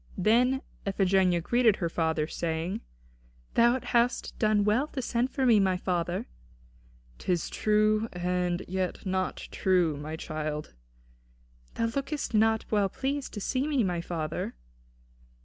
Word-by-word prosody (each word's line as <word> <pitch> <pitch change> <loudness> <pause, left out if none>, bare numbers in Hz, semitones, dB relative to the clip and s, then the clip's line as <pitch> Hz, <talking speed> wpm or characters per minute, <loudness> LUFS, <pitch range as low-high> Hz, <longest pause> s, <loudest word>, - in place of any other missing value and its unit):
Then 245 +7 +3 0.2
Iphigenia 190 -3 +2
greeted 235 +3 +3
her 170 - -1
father, 160 -2 0
saying: 165 +2 -3 0.7
"Thou 240 +2 +4
hast 240 +1 +1
done 215 -2 +3
well 220 +8 +2
to 285 - -6
send 245 0 0
for 265 -1 -1
me, 230 -4 +6
my 190 -2 +2
father." 175 -1 -1 0.9
"'Tis 175 - -1
true 215 +1 +2
and 180 0 -1
yet 185 +1 -3
not 185 -1 -2
true, 180 -5 +2
my 150 +2 -5
child." 155 -1 -4 1.0
"Thou 230 - 0
lookest 275 -1 -2
not 220 +1 +3
well 205 -2 +2
pleased 275 +5 -3
to - - -3
see 260 +7 -1
me, 280 -6 +2
my 175 -3 -1
father." 160 - -4
195 Hz, 130 wpm, -28 LUFS, 175-235 Hz, 1.0 s, me